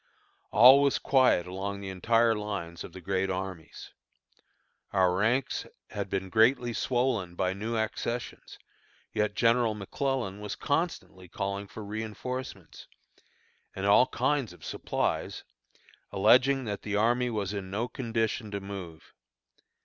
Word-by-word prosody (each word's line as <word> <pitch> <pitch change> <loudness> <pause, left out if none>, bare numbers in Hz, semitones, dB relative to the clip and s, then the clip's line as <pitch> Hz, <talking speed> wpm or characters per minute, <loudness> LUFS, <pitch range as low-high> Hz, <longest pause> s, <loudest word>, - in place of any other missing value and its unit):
All 130 +5 +8
was 140 -1 +3
quiet 130 -10 +3
along 95 +2 -4
the 100 -1 -6
entire 115 +5 +3
lines 100 -6 -5
of - - -9
the 95 - -10
great 95 +1 -1
armies. 95 -3 -6 1.0
Our 95 -2 +3
ranks 115 +7 0 0.2
had 100 -2 -4
been 95 -1 -2
greatly 120 +2 +3
swollen 120 -8 0
by 90 +1 0
new 110 +4 -3
accessions; 115 +2 -4 0.6
yet 105 -1 0
General 115 0 +3
McClellan 105 0 -2
was 105 -1 -5
constantly 145 - -2
calling 100 +3 -4
for 110 - -9
reënforcements, 110 -2 -6 0.9
and 95 - -3
all 105 +5 +6
kinds 130 -5 0
of 90 - -14
supplies, - - -2 0.7
alleging 125 +7 +4
that 105 -2 -4
the 105 -1 -3
army 120 +4 +2
was 105 -4 -2
in 100 -2 -5
no 110 +5 -2
condition 115 -3 -2
to 100 -1 -4
move. 95 -5 -9
105 Hz, 130 wpm, -29 LUFS, 95-120 Hz, 1.0 s, All